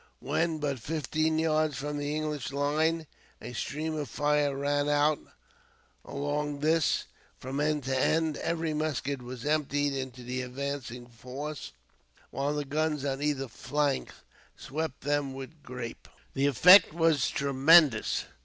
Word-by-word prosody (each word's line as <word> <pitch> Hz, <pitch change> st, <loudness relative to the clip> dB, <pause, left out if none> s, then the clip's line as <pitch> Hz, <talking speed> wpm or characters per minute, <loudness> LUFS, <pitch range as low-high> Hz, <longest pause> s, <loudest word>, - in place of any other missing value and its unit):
When 165 Hz, -1 st, 0 dB
but 145 Hz, -3 st, -2 dB
fifteen 155 Hz, +4 st, -1 dB
yards 155 Hz, -2 st, +1 dB
from 145 Hz, +1 st, -3 dB
the 145 Hz, +1 st, -2 dB
English 150 Hz, -3 st, -3 dB
line, 155 Hz, +3 st, +1 dB, 0.3 s
a 125 Hz, -, -8 dB
stream 150 Hz, +9 st, -3 dB
of 145 Hz, -5 st, -4 dB
fire 145 Hz, 0 st, +1 dB
ran 145 Hz, +1 st, 0 dB, 1.2 s
along 145 Hz, +1 st, -3 dB
this, 160 Hz, +1 st, +2 dB, 0.3 s
from 135 Hz, +2 st, -5 dB
end 150 Hz, -1 st, +1 dB
to 130 Hz, +1 st, -1 dB
end. 160 Hz, +3 st, +2 dB
Every 165 Hz, -2 st, -1 dB
musket 145 Hz, -3 st, -2 dB
was 125 Hz, 0 st, -8 dB
emptied 145 Hz, -1 st, +1 dB
into 130 Hz, -2 st, -5 dB
the 125 Hz, +1 st, -3 dB
advancing 125 Hz, -1 st, -5 dB
force, 130 Hz, +5 st, -7 dB, 0.6 s
while 140 Hz, +2 st, -1 dB
the 145 Hz, -1 st, -2 dB
guns 150 Hz, 0 st, -1 dB
on 135 Hz, 0 st, -2 dB
either 145 Hz, -2 st, 0 dB
flank 140 Hz, +3 st, -1 dB, 0.5 s
swept 155 Hz, -1 st, -4 dB
them 145 Hz, -1 st, -1 dB
with 135 Hz, +4 st, -9 dB
grape. 125 Hz, -3 st, -7 dB, 0.3 s
The 135 Hz, +1 st, +2 dB
effect 175 Hz, -, +8 dB
was 165 Hz, -5 st, +2 dB
tremendous. 140 Hz, -2 st, +4 dB
145 Hz, 135 wpm, -29 LUFS, 135-155 Hz, 1.2 s, effect